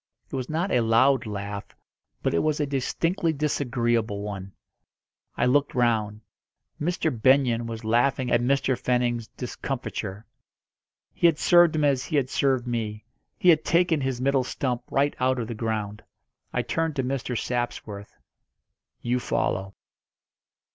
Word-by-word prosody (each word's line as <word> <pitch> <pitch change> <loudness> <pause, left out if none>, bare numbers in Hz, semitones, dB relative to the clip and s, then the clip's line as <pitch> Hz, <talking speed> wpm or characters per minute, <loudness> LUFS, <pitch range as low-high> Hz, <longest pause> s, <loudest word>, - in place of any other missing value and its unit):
It - - -4
was 130 -2 -3
not 170 +5 -1
a 125 - +3
loud 115 +2 +3
laugh, 100 0 -6 0.5
but - - +1
it 85 - +3
was 155 -1 0
a 150 - +1
distinctly 165 +5 0
disagreeable 120 -8 0
one. 100 -2 -6 0.9
I 120 - +2
looked 140 +3 +2
round. 110 -4 +1 0.6
Mr. 160 0 0
Benyon 120 -1 +3
was 115 0 -6
laughing 125 +3 +1
at 120 - +3
Mr. 135 +1 +2
Fenning's 120 -2 0
discomfiture. 115 -5 -5 0.9
He 170 - +4
had 165 -3 +2
served 175 -2 +5
him 155 - +1
as 135 -3 +2
he 160 - -3
had 135 -3 +1
served 130 -3 +1
me 110 -3 -3 0.3
he 180 - +4
had 155 -2 +5
taken 170 -3 +2
his 130 -2 -2
middle 135 0 +2
stump 125 -1 -2
right 140 +1 +1
out 130 0 +2
of 115 -3 -3
the 120 - -4
ground. 110 -2 -3 0.5
I - - -1
turned 160 -2 -1
to 135 - 0
Mr. 125 -2 -2
Sapsworth. 110 -4 -4 0.9
"You 125 +1 +1
follow." 95 -4 -1
125 Hz, 150 wpm, -25 LUFS, 115-140 Hz, 0.9 s, served